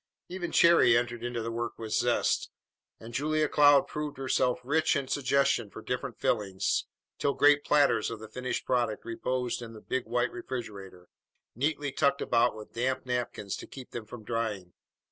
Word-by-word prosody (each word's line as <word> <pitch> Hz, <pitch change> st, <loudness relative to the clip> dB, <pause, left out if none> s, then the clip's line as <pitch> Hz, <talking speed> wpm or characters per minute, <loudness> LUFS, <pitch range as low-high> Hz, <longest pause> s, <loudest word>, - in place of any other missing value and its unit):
Even 175 Hz, -1 st, -4 dB
Cherry 170 Hz, -8 st, +6 dB
entered 120 Hz, -1 st, -2 dB
into 120 Hz, -1 st, -3 dB
the 115 Hz, -, -3 dB
work 115 Hz, 0 st, -4 dB
with 110 Hz, -1 st, -5 dB
zest, 120 Hz, +2 st, +1 dB, 0.5 s
and 115 Hz, +1 st, -10 dB
Julia 155 Hz, +3 st, +1 dB
Cloud 145 Hz, -1 st, +6 dB
proved 150 Hz, -2 st, -5 dB
herself 130 Hz, -2 st, +1 dB
rich 160 Hz, +5 st, +2 dB
in 140 Hz, -2 st, -1 dB
suggestion 135 Hz, -5 st, +1 dB
for -, -, -10 dB
different 125 Hz, 0 st, -4 dB
fillings, 100 Hz, -4 st, 0 dB, 0.3 s
till 140 Hz, -, +1 dB
great 145 Hz, 0 st, +5 dB
platters 145 Hz, -1 st, +3 dB
of 115 Hz, -, -5 dB
the 110 Hz, -, -9 dB
finished 125 Hz, +4 st, -4 dB
product 120 Hz, -4 st, 0 dB
reposed 125 Hz, +1 st, -2 dB
in 115 Hz, -1 st, -8 dB
the 110 Hz, -, -10 dB
big 130 Hz, +2 st, -3 dB
white 120 Hz, +1 st, 0 dB
refrigerator, 105 Hz, -7 st, -7 dB, 0.5 s
neatly 145 Hz, +2 st, -1 dB
tucked 140 Hz, 0 st, +2 dB
about 120 Hz, 0 st, +2 dB
with 110 Hz, -1 st, -11 dB
damp 130 Hz, +3 st, -1 dB
napkins 120 Hz, -5 st, -3 dB
to -, -, -9 dB
keep 130 Hz, -2 st, -11 dB
them 115 Hz, -3 st, -6 dB
from 115 Hz, 0 st, -10 dB
drying. 105 Hz, -6 st, -3 dB
125 Hz, 170 wpm, -29 LUFS, 115-140 Hz, 0.5 s, Cherry